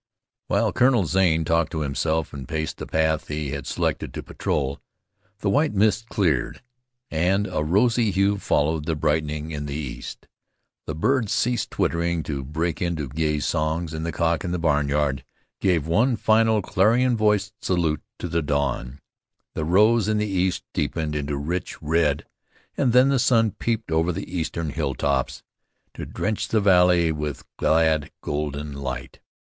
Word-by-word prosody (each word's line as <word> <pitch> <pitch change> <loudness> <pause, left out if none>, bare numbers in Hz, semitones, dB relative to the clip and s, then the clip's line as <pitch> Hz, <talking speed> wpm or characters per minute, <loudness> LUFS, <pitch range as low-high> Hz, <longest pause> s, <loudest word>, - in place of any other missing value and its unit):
While - - +1
Colonel 125 -6 +3
Zane 85 -2 +2
talked 85 +1 +1
to 80 - -2
himself 80 +2 -1
and 70 -3 -7
paced 80 -1 -3
the - - -6
path 80 -1 0
he 75 -2 -3
had - - -5
selected - - -2
to - - -5
patrol, 70 -1 -2 0.6
the 100 - +1
white 145 +3 +2
mists 110 +2 +3
cleared, 80 - 0 0.5
and 90 +5 +1
a 75 - -2
rosy 110 +7 +2
hue 100 +1 +1
followed 75 -2 0
the 80 - 0
brightening 75 0 -1
in 75 -1 -4
the 70 - -4
east. 75 -5 -7 0.6
The 80 - -3
birds 120 - +1
ceased 120 -1 0
twittering 85 -1 0
to 70 -2 -4
break 80 +3 -2
into 85 -6 -2
gay 75 +1 0
songs, 80 +1 -1
and 80 0 -4
the 85 - -2
cock 85 +1 0
in 90 - -3
the 90 - 0
barnyard 75 -3 +1 0.4
gave 85 -6 +1
one 110 +10 +2
final 110 -1 +3
clarion 120 +8 +3
voiced 105 -2 0
salute 85 -5 0 0.2
to - - -4
the 85 0 0
dawn. 70 -2 -2 0.5
The 75 - -2
rose 105 +6 +4
in 110 0 +1
the 105 - +1
east 95 -2 0
deepened 80 -2 -2
into 70 -1 -2
rich 85 +6 -3
red, 75 -2 +1 0.5
and 130 -4 +2
then 125 +3 +5
the 135 -2 +2
sun 115 -3 +3
peeped 115 -5 -3
over 80 +2 +2
the 85 +1 -6
eastern 80 -1 -2
hilltops 70 -1 -1 0.5
to - - -7
drench 105 0 -2
the 110 - +2
valley 90 -4 +4
with 75 -2 -4
glad 80 -1 +2
golden 75 0 -3
light. 65 -3 -6
80 Hz, 160 wpm, -24 LUFS, 75-100 Hz, 0.6 s, then